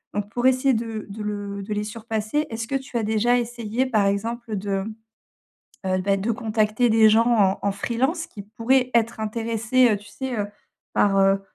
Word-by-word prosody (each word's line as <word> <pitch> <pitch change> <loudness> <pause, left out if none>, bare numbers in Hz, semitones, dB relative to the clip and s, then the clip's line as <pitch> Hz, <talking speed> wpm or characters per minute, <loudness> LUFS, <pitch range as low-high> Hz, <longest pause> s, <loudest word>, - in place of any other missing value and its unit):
Donc 205 0 -2
pour 245 +2 +1
essayer 260 +1 +3
de 225 -2 -3
de 205 +2 -7
le 205 -1 -4
de 200 - -9
les 210 0 -1
surpasser, 220 +6 -2
est-ce 225 0 -4
que - - -6
tu 265 -2 -3
as 230 - 0
déjà 220 +3 +2
essayé, 235 +1 -2
par 215 -6 +2
exemple, 225 +3 -2
de, 195 0 -2 1.0
heu, 185 0 +1
bah, 195 +1 +2
de 200 +4 -2
contacter 220 +2 +1
des 220 0 +6
gens 225 +2 +4
en 205 -5 +3
en 200 - +1
freelance, 250 - -1
qui 205 - -10
pourraient 250 +5 +1
être 230 -1 +1
intéressés, 230 +3 +1
heu, - - +1
tu 205 - -16
sais, 260 -3 -4
heu, 205 - -1 0.5
par, 200 -1 +3
heu, 195 0 +4
220 Hz, 190 wpm, -23 LUFS, 205-240 Hz, 1.0 s, des